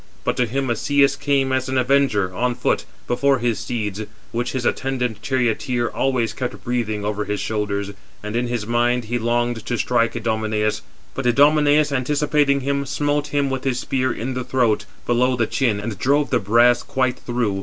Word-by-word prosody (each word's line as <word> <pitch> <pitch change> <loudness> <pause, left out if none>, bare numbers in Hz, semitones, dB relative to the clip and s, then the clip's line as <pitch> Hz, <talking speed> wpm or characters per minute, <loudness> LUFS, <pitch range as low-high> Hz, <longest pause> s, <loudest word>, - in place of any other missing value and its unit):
But - - 0
to 125 - +2
him 135 +2 -1
Asius 140 +4 +2
came 140 -2 +1
as 130 0 0
an 130 - 0
avenger, 125 -8 +2
on 125 +4 0
foot, - - 0 0.2
before 135 +2 +2
his 120 -2 -1
steeds; 110 -3 -3 0.3
which 120 +1 -2
his 130 -2 -2
attendant 125 -5 -1
charioteer 120 -1 0
always 125 -4 0
kept 105 -6 -5
breathing 110 -4 -2
over 105 0 -2
his 105 0 -2
shoulders; 100 -2 -2 0.3
425 105 - -7
and 105 - -4
in 120 +1 0
his 120 -3 -2
mind 120 +1 +1
he 120 +2 -2
longed 120 0 0
to 120 - -2
strike 115 0 +1
Idomeneus, 110 -2 -1 0.3
but 135 - -4
he 120 - +5
(Idomeneus) 150 +2 +4
anticipating 140 +1 +1
him, 140 +1 -1
smote 145 +1 0
him 145 -1 0
with 130 -1 -3
his 130 -3 0
spear 130 0 -1
in 125 +3 -4
the 125 0 -3
throat, 120 -4 +1 0.2
below 125 +2 +2
the 120 -2 +1
chin, 115 -3 0
and 105 -1 -5
drove 145 +5 +2
the - - +3
brass 120 +4 +4
quite 130 -1 -1
through. 120 -5 -1
120 Hz, 185 wpm, -21 LUFS, 110-135 Hz, 0.3 s, he